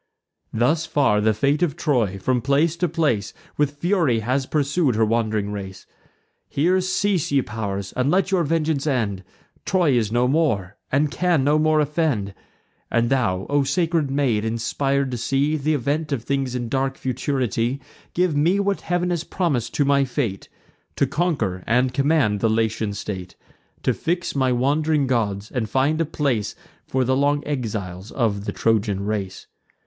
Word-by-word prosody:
Thus 155 +9 +1
far 135 -10 +2
the 110 +1 +3
fate 140 +8 +1
of 170 -6 +1
Troy, 115 - 0
from 125 +6 0
place 145 +6 +2
to 180 0 0
place, 145 - 0 0.2
With 145 0 0
fury 165 - +1
has 130 +4 -1
pursued 145 -2 +1
her 110 0 +3
wand'ring 110 -2 0
race. 95 -2 -7 0.6
Here 180 +6 +2
cease, 190 -2 0
ye 140 -2 +3
pow'rs, 100 -4 -4
and 130 +2 +1
let 190 +3 +2
your 185 -3 +3
vengeance 155 -2 0
end: 105 -9 -1 0.4
Troy 180 -6 +2
is 115 -4 +1
no 120 +2 +2
more, 120 - 0 0.2
and 145 +2 +2
can 175 -6 +1
no 150 +2 +3
more 155 0 +3
offend. 145 -10 0 0.6
And 120 +1 +1
thou, 95 -8 +1
O 145 0 +2
sacred 160 +1 0
maid, 135 -6 +1
inspir'd 135 +4 -1
to 125 - -2
see 135 +6 +1
Th' 150 -1 -4
event 150 +1 0
of 130 -5 -1
things 135 -2 -1
in 120 -1 -2
dark 135 +2 -1
futurity; 130 -1 -1 0.4
Give 180 -3 +2
me 170 +7 +3
what 200 0 0
Heav'n 175 +1 -1
has 170 -2 -1
promis'd 140 - -1
to 145 - +2
my 140 0 +3
fate, 125 -7 -3 0.5
To - - +2
conquer 115 - -1
and 125 +3 +2
command 135 -6 +2
the 115 - +2
Latian 110 -1 0
state; 95 -3 -6 0.5
To - - +2
fix 175 -1 -2
my 130 -2 +2
wand'ring 145 +4 +1
gods, 110 -5 -1
and 115 -4 -2
find 140 +6 +1
a - - +2
place 135 -9 -1 0.3
For 130 0 +1
the 130 +1 +1
long 145 +1 +1
exiles 105 -8 -4
of 105 -6 -1
the - - -2
Trojan 105 -3 0
race. 100 -3 -3
135 Hz, 165 wpm, -22 LUFS, 110-155 Hz, 0.6 s, the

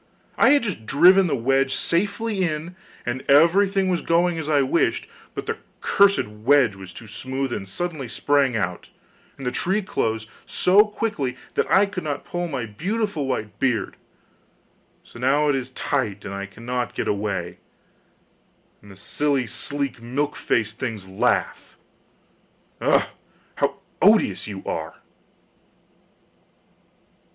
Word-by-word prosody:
I - - +5
had 285 -2 +5
just 175 - -4
driven 180 - +6
the 155 - 0
wedge 135 +2 +1
safely 205 +4 0
in, 165 +1 -3 0.3
and 120 +2 -2
everything 190 +6 +5
was 180 -2 0
going 170 0 +2
as 155 -1 -4
I 145 -2 +4
wished; 150 +6 +1 0.3
but - - -4
the - - -3 0.2
cursed 200 - +3
wedge 115 +3 +3
was 95 -1 -10
too 115 - -9
smooth 130 +4 -3
and 95 - -5
suddenly 155 - -3
sprang 140 +1 +1
out, 90 -4 -3 0.5
and 135 - -8
the 125 - 0
tree 195 +9 0
closed 110 - -2 0.2
so 200 +4 +4
quickly 205 - -3 0.2
that - - 0
I 195 +2 +5
could 200 -2 -6
not 145 -2 -3
pull 175 0 -3
out - - -5
my 130 -6 -3
beautiful 180 - -2
white 105 -6 -3
beard; 120 -6 0 1.1
so - - -14
now 145 +4 +2
it 145 - +3
is 130 -1 -3
tight 120 -7 -2
and 95 - -5
I 100 0 -5
cannot 120 +4 -4
get - - -2
away, 95 -4 -2 1.2
and 100 - -16
the 95 - -13
silly, 140 +5 0
sleek, 135 +2 -4
milk 140 +5 -2
faced 110 -1 -1
things 110 -6 -4
laugh! 95 +1 -1 1.0
Ugh! - - +3 0.5
how - - 0 0.3
odious - - +4
you 100 -2 -7
are! - - -4
135 Hz, 145 wpm, -23 LUFS, 110-175 Hz, 1.2 s, driven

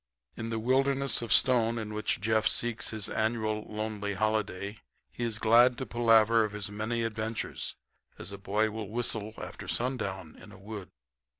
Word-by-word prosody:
In 115 0 -5
the 115 - -2
wilderness 135 +3 +2
of 115 - -5
stone 115 -2 +4
in 110 -1 -4
which 105 0 0
Jeff 110 +1 +2
seeks 120 -1 0
his 110 -2 -2
annual 110 -1 0
lonely 105 -1 -3
holiday 105 -1 -1 0.3
he 120 - -5
is 115 -3 0
glad 120 +3 +5
to 130 - -3
palaver 115 -1 +4
of 105 -1 -3
his 105 -1 -5
many 110 +3 -2
adventures, 110 0 -3 0.4
as - - -7
a 100 - -8
boy 105 +3 +1
will 110 -2 -5
whistle 110 -2 -2
after - - -7
sundown 100 -9 -2
in - - -13
a - - -12
wood. 100 -1 -8
110 Hz, 170 wpm, -30 LUFS, 105-115 Hz, 0.4 s, glad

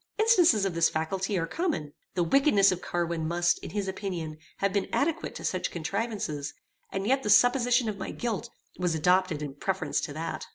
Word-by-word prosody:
Instances 360 - +5
of 195 - -1
this 165 0 +3
faculty 190 +5 -2
are 165 - 0
common. 170 - -2 0.2
The 175 - +2
wickedness 205 - +4
of 180 - -3
Carwin 170 -2 -2
must, 175 +1 +1
in - - -8
his 205 -1 -3
opinion, 175 -5 -4 0.2
have 200 0 0
been 200 - 0
adequate 310 +3 -1
to - - -6
such 185 - -1
contrivances, 175 -4 -3 0.4
and 195 0 -3
yet 265 +4 +2
the 210 - -3
supposition 245 +2 +4
of 205 -2 -3
my - - -4
guilt 230 -4 -3 0.3
was 175 -2 0
adopted 180 -1 +2
in 145 -2 -5
preference 190 +6 -1
to 145 - -5
that. 165 +2 -5
190 Hz, 190 wpm, -28 LUFS, 165-220 Hz, 0.4 s, Instances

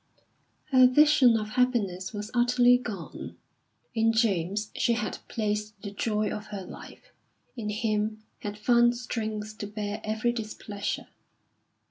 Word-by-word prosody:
Her 255 -1 +8
vision 270 -3 +6
of 215 -1 -3
happiness 215 -7 0
was 210 0 -6
utterly 245 0 +5
gone. 210 -8 -7 0.6
In 225 0 +3
James 205 -2 0
she 235 - +2
had 230 -2 -3
placed 210 -1 -2
the 200 - -5
joy 210 +1 -1
of 210 0 -5
her 205 -2 -6
life; - - -12 0.4
in 220 -4 -4
him 215 0 -1 0.2
had 205 0 -5
found 240 +2 +4
strength 215 -3 -4
to 205 - -4
bear 210 0 -4
every 220 +2 0
displeasure. 215 -3 -4
215 Hz, 130 wpm, -28 LUFS, 210-240 Hz, 0.6 s, Her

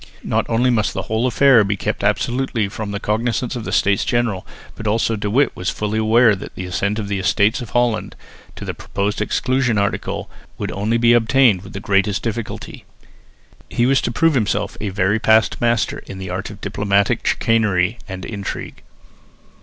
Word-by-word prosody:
Not - - -1
only 120 +2 +2
must 110 -3 0
the - - -2
whole 110 +3 0
affair 130 -2 +5
be 100 0 -1
kept - - -3
absolutely 120 +1 0
from 105 0 -5
the 100 0 -3
cognisance 115 +4 -1
of 120 - -5
the - - -4
States 100 -1 +2
General, 120 -6 -1 0.3
but 110 - -5
also 115 +1 +1
De 105 -1 -3
Witt 135 +7 +2
was 90 - -2
fully 105 +1 -2
aware 110 0 +4
that 95 - -9
the 95 - -5
assent 100 +3 -1
of 105 -2 -3
the 100 -1 -2
Estates 100 +5 +2
of 120 - -7
Holland 120 -2 0 0.4
to - - -8
the - - -3
proposed 100 +1 -3
exclusion 125 +1 +1
article 100 0 -2 0.3
could - - -4
only 105 +4 0
be 120 0 +4
obtained 120 -3 +4
with 95 - -12
the 100 - -5
greatest 100 0 +1
difficulty. 115 -1 -5 0.9
He 120 - +1
was 135 +1 +3
to - - -2
prove 165 +6 +2
himself 110 -6 0
a 105 - -2
very 95 +3 +1
past 110 0 +3
master 120 -1 +1
in 95 - -8
the 95 -1 -6
art 95 +2 -4
of 105 -1 -11
diplomatic 100 -1 +1
chicanery 110 -2 +1
and 95 -1 -6
intrigue. 100 -3 -6
110 Hz, 185 wpm, -20 LUFS, 100-120 Hz, 0.9 s, affair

